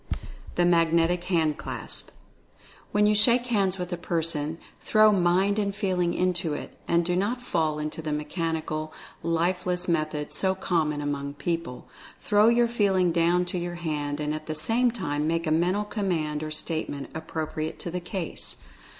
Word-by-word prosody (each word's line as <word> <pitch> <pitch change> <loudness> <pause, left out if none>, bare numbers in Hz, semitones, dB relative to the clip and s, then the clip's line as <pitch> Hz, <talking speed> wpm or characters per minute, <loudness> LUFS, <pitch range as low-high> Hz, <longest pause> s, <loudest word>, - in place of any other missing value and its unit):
THE 175 - +3
MAGNETIC 170 0 +3
HAND 160 -5 +1
CLASP. - - -5 0.8
When 210 0 +3
you 210 - +4
shake 235 +4 +4
hands 200 -6 +2
with 180 -1 -4
a - - -2
person 165 -2 -1 0.2
throw 215 0 +5
Mind 190 +2 +3
and 200 -1 -1
Feeling 185 -4 0
into 180 -4 0
it, - - -7
and 170 0 +2
do 175 0 0
not 205 +7 0
fall 160 -10 0
into 150 +1 -4
the 155 - -4
mechan 160 +2 -1
ical, 155 0 -3 0.3
lifeles 180 +2 0
method 155 -3 -1
so 190 +4 +1
common 160 -5 0
among 140 -1 -3
people. 165 -6 -3 0.3
Throw 210 +1 +4
your 235 0 +5
Feeling 195 -6 +2
down 170 +2 +3
to 175 0 -2
your 175 0 -4
hand, 150 -4 -3
and 150 0 -1
at 155 0 -6
the 155 - -2
same 230 +10 +2
time 155 -10 -2
make 165 +1 0
a 155 - 0
mental 180 +6 +2
command 175 -8 -1
or 155 - -3
statement 155 -2 -3
appropriate 160 0 -4
to 170 - -5
the 180 - -2
case. 175 -1 -5
170 Hz, 165 wpm, -27 LUFS, 155-190 Hz, 0.8 s, throw